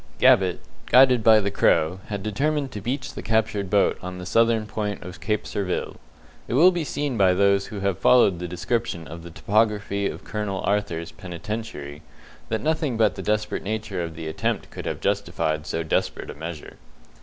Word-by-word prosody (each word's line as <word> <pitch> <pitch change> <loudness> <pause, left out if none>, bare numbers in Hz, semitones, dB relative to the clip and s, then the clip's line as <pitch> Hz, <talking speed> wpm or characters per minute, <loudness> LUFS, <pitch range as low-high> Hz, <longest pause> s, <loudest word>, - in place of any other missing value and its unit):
Gabbett, 95 -2 +5 0.3
guided 125 -2 +6
by 110 -1 +7
the 100 -1 -1
Crow, 85 -1 +2
had 100 -2 -4
determined 140 +6 -1
to 105 - -6
beach 130 +6 -3
the - - -6
captured 110 -3 0
boat 100 0 +2
on 90 0 -6
the 90 - -7
southern 115 +2 +2
point 105 -2 -4
of 90 0 -9
Cape 105 -3 -1
Surville. 95 -3 -3 0.5
It - - -2
will 175 +7 +7
be 175 -2 -2
seen 145 -3 -2
by 95 -3 +4
those 100 0 +3
who 105 -2 -6
have 100 -3 0
followed 100 -8 +5
the 90 - -4
description 90 -1 -2
of 85 +3 -8
the 85 - -10
topography 105 +1 0
of - - -8
Colonel 105 -3 -3
Arthur's 100 -5 -1
Penitentiary, 90 -5 -6 0.5
that 110 - -1
nothing 155 -5 0
but 110 -2 +3
the - - -7
desperate 105 0 -1
nature 105 -3 -3
of 85 -1 -6
the 80 0 -6
attempt 80 - -2
could - - -7
have - - -3
justified 75 -1 -1
so 80 - -2
desperate 80 - -1
a - - -8
measure. 80 0 -8
100 Hz, 185 wpm, -24 LUFS, 90-110 Hz, 0.5 s, by